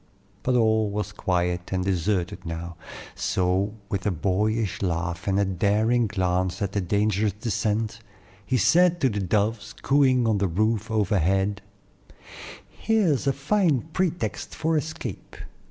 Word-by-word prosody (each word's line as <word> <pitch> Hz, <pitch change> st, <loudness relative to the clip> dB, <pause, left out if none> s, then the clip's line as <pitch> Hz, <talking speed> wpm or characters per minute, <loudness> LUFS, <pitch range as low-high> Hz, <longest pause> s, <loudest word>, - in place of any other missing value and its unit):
But 125 Hz, -, +1 dB
all 110 Hz, -2 st, +3 dB
was 105 Hz, +1 st, -3 dB
quiet 90 Hz, -3 st, -1 dB
and 95 Hz, -1 st, -1 dB
deserted 95 Hz, -1 st, -1 dB
now; 85 Hz, +1 st, -6 dB, 0.4 s
so, 95 Hz, +3 st, 0 dB
with 100 Hz, -2 st, -3 dB
a -, -, +4 dB
boyish 100 Hz, +4 st, 0 dB
laugh 85 Hz, -1 st, -2 dB
and 100 Hz, 0 st, +2 dB
a 100 Hz, -, +3 dB
daring 105 Hz, +5 st, +2 dB
glance 95 Hz, -2 st, -1 dB
at 100 Hz, -2 st, -2 dB
the 100 Hz, -, -1 dB
dangerous 105 Hz, +2 st, +1 dB
descent, 105 Hz, +1 st, -2 dB, 0.4 s
he 130 Hz, +5 st, 0 dB
said 175 Hz, -, +4 dB
to 135 Hz, -, +4 dB
the 105 Hz, -2 st, -2 dB
doves 105 Hz, +3 st, -1 dB
cooing 130 Hz, -4 st, +3 dB
on 110 Hz, -3 st, +2 dB
the 100 Hz, -, +1 dB
roof 110 Hz, +5 st, 0 dB
overhead: 100 Hz, -1 st, +1 dB, 1.1 s
"Here's 195 Hz, -, +1 dB
a -, -, +5 dB
fine 155 Hz, -, +1 dB
pretext 180 Hz, -2 st, -2 dB
for 160 Hz, +1 st, 0 dB
escape. 155 Hz, +1 st, -5 dB
105 Hz, 140 wpm, -25 LUFS, 95-115 Hz, 1.1 s, a